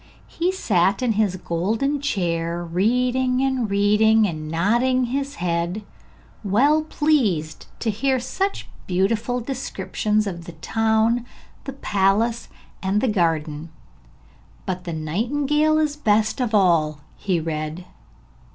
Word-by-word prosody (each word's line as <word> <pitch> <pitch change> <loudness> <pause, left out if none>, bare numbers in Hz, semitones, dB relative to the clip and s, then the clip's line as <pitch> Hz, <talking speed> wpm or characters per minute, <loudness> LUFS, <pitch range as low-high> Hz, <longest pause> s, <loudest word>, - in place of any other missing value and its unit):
He 350 +2 -1
sat 195 - +1
in 245 - +2
his 210 -3 +1
golden 215 - -1
chair 170 -8 -1
reading 250 +8 +1
and 260 -5 0
reading, 210 +2 +4
and 155 -3 -5
nodding 240 +10 +2
his 275 +3 -2
head, 175 +2 -2 0.6
well 270 +10 +3
pleased 235 - 0
to 225 - +1
hear 260 +5 0
such 385 +11 -3 0.2
beautiful 215 +7 0
descriptions 215 -4 -2
of 170 -4 -5
the 175 - -9
town, 225 +7 +1 0.4
the 275 - -5
palace 215 0 +1 0.3
and 195 +2 +1
the 260 - +1
garden. 165 -6 0 1.0
'But 185 -2 -4
the 170 - -4
nightingale 280 - +1
is 305 -2 +1
the - - -25
best 215 +3 +2
of 230 -3 0
all,' 160 -6 +2
he 185 -4 -1
read. 155 +2 -4
210 Hz, 125 wpm, -22 LUFS, 175-255 Hz, 1.0 s, reading